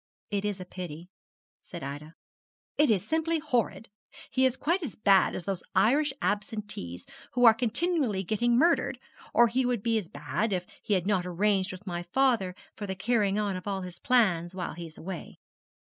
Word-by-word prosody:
'It 200 Hz, -1 st, 0 dB
is 205 Hz, -2 st, -2 dB
a 185 Hz, -, -6 dB
pity,' 180 Hz, -1 st, -8 dB, 0.5 s
said -, -, -9 dB
Ida. 145 Hz, +4 st, -7 dB, 0.6 s
'It 300 Hz, -2 st, +4 dB
is 210 Hz, -1 st, +2 dB
simply 325 Hz, +1 st, +1 dB
horrid. 250 Hz, -7 st, -1 dB, 0.4 s
He 260 Hz, 0 st, +3 dB
is 260 Hz, 0 st, -2 dB
quite 345 Hz, +5 st, +1 dB
as 285 Hz, -, -5 dB
bad 195 Hz, -3 st, +4 dB
as -, -, -4 dB
those 195 Hz, -3 st, -2 dB
Irish 270 Hz, +10 st, +4 dB
Absentees 205 Hz, -, -3 dB, 0.3 s
who 245 Hz, 0 st, +4 dB
are 225 Hz, -, +10 dB
continually 240 Hz, -, 0 dB
getting 235 Hz, +5 st, +2 dB
murdered; 335 Hz, +6 st, +3 dB, 0.3 s
or 240 Hz, -, +6 dB
he 255 Hz, +3 st, +1 dB
would 245 Hz, -4 st, 0 dB
be 230 Hz, -1 st, +2 dB
as 190 Hz, -, -7 dB
bad, 160 Hz, +9 st, -2 dB
if 180 Hz, -1 st, -1 dB, 0.2 s
he 205 Hz, -, +1 dB
had 185 Hz, -2 st, 0 dB
not 190 Hz, -3 st, +1 dB
arranged 190 Hz, +1 st, +1 dB
with 185 Hz, +2 st, -10 dB
my 175 Hz, -3 st, -3 dB
father 195 Hz, -1 st, +1 dB, 0.2 s
for 205 Hz, -, -5 dB
the 190 Hz, -, -3 dB
carrying 205 Hz, -1 st, +1 dB
on 205 Hz, -2 st, 0 dB
of 185 Hz, +2 st, -7 dB
all 195 Hz, -1 st, -1 dB
his 180 Hz, -1 st, -8 dB
plans 185 Hz, -8 st, +2 dB
while 180 Hz, -2 st, -3 dB
he 170 Hz, 0 st, -7 dB
is 160 Hz, -, -15 dB
away.' 180 Hz, 0 st, -7 dB
205 Hz, 190 wpm, -29 LUFS, 180-240 Hz, 0.6 s, are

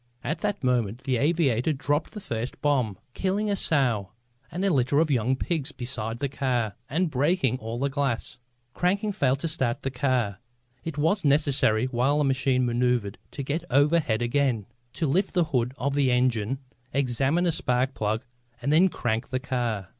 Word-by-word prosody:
At 155 Hz, +3 st, -2 dB
that 205 Hz, -5 st, -2 dB
moment 120 Hz, -2 st, 0 dB
the 130 Hz, -2 st, +1 dB
aviator 145 Hz, -2 st, +2 dB
dropped 145 Hz, +2 st, -1 dB
the 210 Hz, -, -6 dB
first 120 Hz, -, -4 dB
bomb, 130 Hz, -9 st, +1 dB, 0.2 s
killing 205 Hz, +2 st, 0 dB
a -, -, +2 dB
sow 125 Hz, -, +1 dB, 0.4 s
and 185 Hz, +3 st, -2 dB
a 195 Hz, -, +3 dB
litter 130 Hz, +1 st, +2 dB
of 160 Hz, -1 st, +2 dB
young 125 Hz, 0 st, +2 dB
pigs 150 Hz, +1 st, -2 dB
beside 120 Hz, -4 st, -4 dB
the 140 Hz, +3 st, -1 dB
car 125 Hz, -5 st, -1 dB, 0.2 s
and 165 Hz, +2 st, 0 dB
breaking 140 Hz, -2 st, +1 dB
all 115 Hz, +1 st, -5 dB
the 140 Hz, +3 st, 0 dB
glass. 140 Hz, -5 st, -2 dB, 0.3 s
Cranking 200 Hz, +4 st, +1 dB
failed 135 Hz, -8 st, +1 dB
to -, -, -1 dB
start 135 Hz, -5 st, -1 dB
the 135 Hz, -, -1 dB
car. 125 Hz, -6 st, 0 dB, 0.4 s
It 160 Hz, -3 st, -5 dB
was 165 Hz, +7 st, +2 dB
necessary, 140 Hz, -6 st, +3 dB
while 130 Hz, +3 st, +1 dB
the 150 Hz, -, +2 dB
machine 130 Hz, -2 st, +2 dB
manoeuvred 120 Hz, -4 st, 0 dB
to 140 Hz, -, -5 dB
get 150 Hz, +5 st, -2 dB
overhead 145 Hz, -5 st, +3 dB
again, 120 Hz, -4 st, +1 dB, 0.3 s
to 165 Hz, -, -1 dB
lift 180 Hz, +8 st, +1 dB
the 175 Hz, -, +4 dB
hood 125 Hz, -6 st, 0 dB
of 140 Hz, +2 st, -1 dB
the 140 Hz, -2 st, +2 dB
engine, 125 Hz, -1 st, +1 dB, 0.3 s
examine 135 Hz, +5 st, +1 dB
a 175 Hz, -, +3 dB
spark 130 Hz, -3 st, 0 dB
plug 110 Hz, +2 st, -1 dB, 0.4 s
and 140 Hz, +5 st, 0 dB
then 180 Hz, +5 st, +6 dB
crank 115 Hz, -6 st, -2 dB
the 130 Hz, -, -1 dB
car. 120 Hz, -7 st, -2 dB
135 Hz, 175 wpm, -26 LUFS, 120-150 Hz, 0.4 s, then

